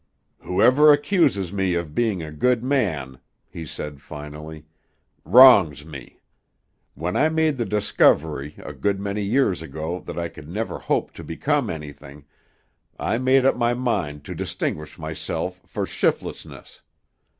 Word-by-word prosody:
"Whoever 125 Hz, +11 st, +5 dB
accuses 145 Hz, -, +2 dB
me 95 Hz, -3 st, 0 dB
of 85 Hz, -3 st, -3 dB
being 105 Hz, -6 st, 0 dB
a 80 Hz, -, -7 dB
good 120 Hz, +10 st, +1 dB
man," 90 Hz, -, -1 dB, 0.3 s
he 80 Hz, -2 st, -8 dB
said 75 Hz, -1 st, -7 dB
finally, 75 Hz, +1 st, -9 dB, 0.6 s
"wrongs 100 Hz, -, +7 dB
me. 70 Hz, -6 st, -12 dB, 0.7 s
When 85 Hz, +3 st, -3 dB
I 155 Hz, -, +3 dB
made 160 Hz, -3 st, +1 dB
the 120 Hz, -, 0 dB
discovery 80 Hz, -8 st, +1 dB
a -, -, -9 dB
good 100 Hz, -1 st, -1 dB
many 100 Hz, +1 st, -3 dB
years 100 Hz, -3 st, +1 dB
ago 80 Hz, +3 st, -5 dB
that -, -, -6 dB
I 85 Hz, 0 st, -2 dB
could 75 Hz, -2 st, -13 dB
never 110 Hz, +6 st, -4 dB
hope -, -, -1 dB
to -, -, -10 dB
become 140 Hz, -, -1 dB
anything, 75 Hz, -2 st, -9 dB, 0.7 s
I 115 Hz, -, -1 dB
made 130 Hz, +1 st, +3 dB
up 135 Hz, -, +4 dB
my 120 Hz, 0 st, +1 dB
mind 95 Hz, -, -2 dB
to -, -, -6 dB
distinguish 75 Hz, 0 st, -4 dB
myself -, -, -5 dB
for -, -, -3 dB
shiftlessness. -, -, -3 dB
95 Hz, 140 wpm, -23 LUFS, 75-125 Hz, 0.7 s, wrongs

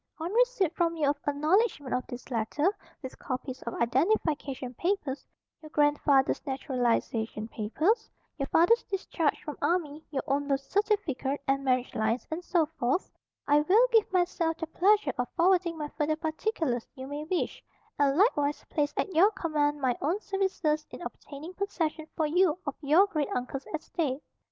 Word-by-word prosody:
On 340 Hz, +4 st, -4 dB
receipt -, -, +2 dB
from 335 Hz, -1 st, +1 dB
you 305 Hz, -3 st, +1 dB
of 290 Hz, -, -6 dB
acknowledgment 300 Hz, -, +1 dB
of 250 Hz, -, -1 dB
this 245 Hz, +1 st, -9 dB
letter, 290 Hz, -, 0 dB, 0.3 s
with 260 Hz, -, -8 dB
copies 260 Hz, 0 st, -5 dB
of 235 Hz, -, -5 dB
identification 275 Hz, -, 0 dB
papers 320 Hz, -, -2 dB, 0.3 s
(your 310 Hz, -, -11 dB
grandfather's 290 Hz, -2 st, +3 dB
naturalization 245 Hz, -5 st, -1 dB
papers, 315 Hz, -, 0 dB, 0.3 s
your 275 Hz, -, -1 dB
father's 350 Hz, -, +4 dB
discharge 370 Hz, -5 st, -1 dB
from 300 Hz, -, -7 dB
army, 315 Hz, -3 st, 0 dB
your 275 Hz, -3 st, -2 dB
own 280 Hz, +1 st, 0 dB
birth 275 Hz, -1 st, +1 dB
certificate 310 Hz, -, 0 dB
and 275 Hz, 0 st, +1 dB
marriage 255 Hz, -1 st, +1 dB
lines, 220 Hz, +3 st, 0 dB
and 330 Hz, +3 st, -3 dB
so 345 Hz, -3 st, +2 dB
forth) 255 Hz, +10 st, 0 dB, 0.4 s
I 290 Hz, +1 st, +5 dB
will 405 Hz, +11 st, +5 dB
give 445 Hz, -4 st, +4 dB
myself 350 Hz, -3 st, +1 dB
the 325 Hz, -, -3 dB
pleasure 370 Hz, -2 st, +3 dB
of 245 Hz, -, 0 dB
forwarding 345 Hz, -2 st, +3 dB
any 295 Hz, -1 st, -4 dB
further 310 Hz, 0 st, +1 dB
particulars 315 Hz, -, -2 dB
you 260 Hz, -1 st, -7 dB
may 290 Hz, +2 st, -5 dB
wish, 350 Hz, +2 st, -2 dB, 0.4 s
and 280 Hz, 0 st, +3 dB
likewise 295 Hz, -8 st, +2 dB
place 295 Hz, -1 st, 0 dB
at 385 Hz, -, -1 dB
your 355 Hz, +6 st, +6 dB
command 295 Hz, -7 st, -1 dB
my 255 Hz, -2 st, +2 dB
own 335 Hz, +8 st, 0 dB
services 380 Hz, -7 st, 0 dB
in -, -, -9 dB
obtaining 310 Hz, +5 st, -8 dB
possession 330 Hz, -5 st, -2 dB
for 315 Hz, -, +1 dB
you 355 Hz, +1 st, +3 dB
of 285 Hz, -, -2 dB
your 310 Hz, +7 st, +5 dB
great 305 Hz, -8 st, -2 dB
uncle's 250 Hz, +2 st, -4 dB
estate. 305 Hz, -3 st, -2 dB
305 Hz, 160 wpm, -29 LUFS, 275-360 Hz, 0.4 s, your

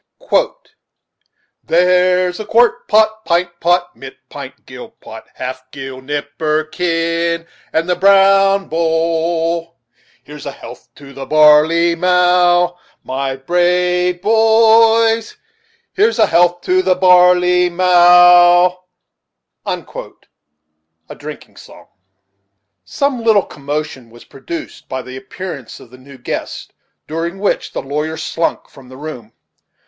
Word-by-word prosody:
"There's 180 Hz, +1 st, +1 dB
quart 235 Hz, +3 st, +1 dB
pot, 220 Hz, 0 st, +2 dB
pint 175 Hz, -1 st, -1 dB
pot. 175 Hz, +1 st, 0 dB
Mit 135 Hz, 0 st, -12 dB
pint, -, -, -11 dB
Gill -, -, -11 dB
pot, -, -, -12 dB
half 130 Hz, 0 st, -7 dB
gill, 135 Hz, -1 st, -9 dB
nipperkin. 165 Hz, +4 st, -2 dB, 0.3 s
And 165 Hz, +1 st, -1 dB
the 180 Hz, -, 0 dB
brown 195 Hz, +1 st, +3 dB
bowl 165 Hz, +1 st, -2 dB, 0.5 s
Here's 150 Hz, 0 st, -11 dB
a -, -, -4 dB
health -, -, -13 dB
to 140 Hz, -1 st, -14 dB
the 135 Hz, -1 st, -9 dB
barley 155 Hz, +3 st, +4 dB
mow, 180 Hz, 0 st, +2 dB, 0.2 s
My 135 Hz, +1 st, -4 dB
brave 180 Hz, +4 st, 0 dB
boys, 225 Hz, +1 st, +3 dB, 0.6 s
Here's 435 Hz, +3 st, +1 dB
a -, -, +4 dB
health 175 Hz, 0 st, +1 dB
to 370 Hz, +1 st, +1 dB
the 185 Hz, -, +1 dB
barley 180 Hz, -1 st, +4 dB
mow." 175 Hz, 0 st, +5 dB, 2.3 s
Drinking -, -, -11 dB
Song. -, -, -16 dB, 1.0 s
Some 280 Hz, -5 st, -3 dB
little 220 Hz, -3 st, +3 dB
commotion 145 Hz, -3 st, -6 dB
was 120 Hz, +1 st, -17 dB
produced 335 Hz, -, -9 dB
by 130 Hz, -1 st, -5 dB
the 130 Hz, -, -10 dB
appearance 135 Hz, 0 st, -9 dB
of 120 Hz, -, -17 dB
the 130 Hz, -, -15 dB
new 135 Hz, +1 st, -15 dB
guests, 120 Hz, -, -6 dB, 0.4 s
during 165 Hz, +3 st, -4 dB
which 200 Hz, +1 st, -2 dB
the -, -, -5 dB
lawyer 150 Hz, +3 st, -4 dB
slunk 165 Hz, +1 st, -3 dB
from 130 Hz, -2 st, -17 dB
the 130 Hz, -, -13 dB
room. 130 Hz, -7 st, -9 dB
175 Hz, 110 wpm, -15 LUFS, 155-180 Hz, 2.3 s, mow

